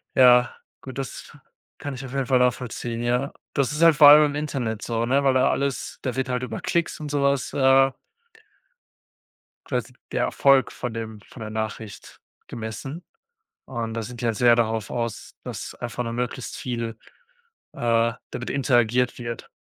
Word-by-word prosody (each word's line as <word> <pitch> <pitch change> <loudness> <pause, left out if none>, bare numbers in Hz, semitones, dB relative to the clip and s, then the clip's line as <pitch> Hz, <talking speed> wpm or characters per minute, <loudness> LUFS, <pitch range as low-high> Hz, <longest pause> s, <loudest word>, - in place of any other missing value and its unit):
Ja, 125 -1 +6 0.3
gut, 130 -1 -9
das 135 -2 -6 0.5
kann 145 -1 -5
ich 130 0 -7
auf 130 - -9
jeden 135 -1 0
Fall 130 0 +3
nachvollziehen, 120 -1 -1
ja. 125 +3 0 0.2
Das 140 -1 +1
ist 150 - -3
halt 165 -2 +7
vor 145 -1 +9
allem 150 +1 +9
im 145 - -6
Internet 125 -7 -3
so, 115 -1 -1
ne? 135 +3 +2
Weil 135 -1 +4
da 130 - +4
alles 140 -2 -2
da 130 - -3
wird 130 0 -1
halt 125 0 -1
über 125 - -4
Klicks 170 -2 -1
und 150 -1 -5
so 145 -1 0
was, 140 -1 +1
äh 135 0 +5 1.8
quasi - - -3 0.2
der - - +1
Erfolg 135 -1 +3
von 125 -2 -5
dem 110 -2 -6
von 125 - -13
der 110 -1 -5
Nachricht 110 -1 -6 0.3
gemessen. 115 - -6 0.6
Und 115 -3 -4
da 115 - -3
sind 120 +2 -8
die - - -2
halt 115 -2 +1
sehr 120 -1 +6
darauf 110 -2 0
aus, 115 -2 -4
dass - - -6
einfach 120 0 -4
nur 115 -1 -4
möglichst 125 +1 -4
viel, 115 -3 -4 0.8
äh, 115 -1 +2 0.2
damit 125 - -5
interagiert 125 -2 +2
wird. 115 -1 -6
125 Hz, 175 wpm, -24 LUFS, 115-135 Hz, 1.8 s, vor